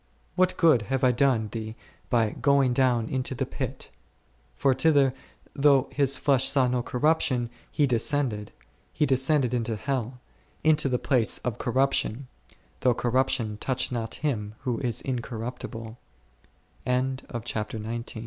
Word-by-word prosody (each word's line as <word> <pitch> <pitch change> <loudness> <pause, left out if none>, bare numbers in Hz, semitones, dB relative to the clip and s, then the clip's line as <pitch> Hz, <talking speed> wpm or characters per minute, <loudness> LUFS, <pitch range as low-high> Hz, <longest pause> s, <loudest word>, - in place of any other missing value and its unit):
what 185 0 +2
good 155 -9 +5
have 135 +5 -2
I 130 - +5
done 125 -4 +1
thee 110 0 -6 0.3
by 115 -4 +2
going 140 -3 +2
down 120 -3 +2
into 130 +1 -3
the - - -1
pit? - - -6 0.6
For 135 - +2
thither, 135 -1 +3 0.4
though 140 -2 +3
His 140 -2 +2
flesh 135 -2 +2
saw 130 -3 +3
no 125 0 0
corruption, 130 -2 +1 0.2
He 150 - +2
descended; 120 -3 0 0.4
He 150 - +1
descended 130 -1 +2
into 115 -2 -1
hell, 125 +1 -3 0.4
into 155 -2 +3
the 125 - +1
place 125 -3 +2
of 120 -4 -2
corruption, 130 0 0 0.5
though 125 -2 +2
corruption 120 -4 0
touched 130 +2 -1
not 115 -2 -3
Him 105 -7 -2
who 125 -4 -2
130 Hz, 120 wpm, -26 LUFS, 120-140 Hz, 0.6 s, good